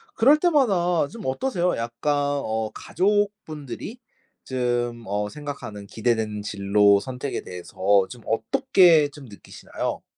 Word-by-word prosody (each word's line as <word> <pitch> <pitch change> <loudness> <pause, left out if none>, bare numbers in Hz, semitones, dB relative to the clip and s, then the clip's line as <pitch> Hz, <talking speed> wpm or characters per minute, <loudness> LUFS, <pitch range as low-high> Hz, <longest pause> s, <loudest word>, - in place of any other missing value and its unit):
그럴 275 +7 +5
때마다 195 - +2
좀 225 -3 -10
어떠세요? 180 - 0
약간 115 +5 -2
어 140 -7 -1
가족분들이 205 - -2 0.5
좀 120 -2 -2
어 105 +1 -2
생각하는 140 -9 -8
기대되는 110 -2 -1
진로 100 0 +3
선택에 130 +4 -5
대해서 90 -1 -10 0.3
좀 120 -2 -11
어떻게 175 - +4
좀 145 -1 -13
느끼시나요? 105 -4 -6
135 Hz, 270 characters per minute, -24 LUFS, 110-180 Hz, 0.5 s, 그럴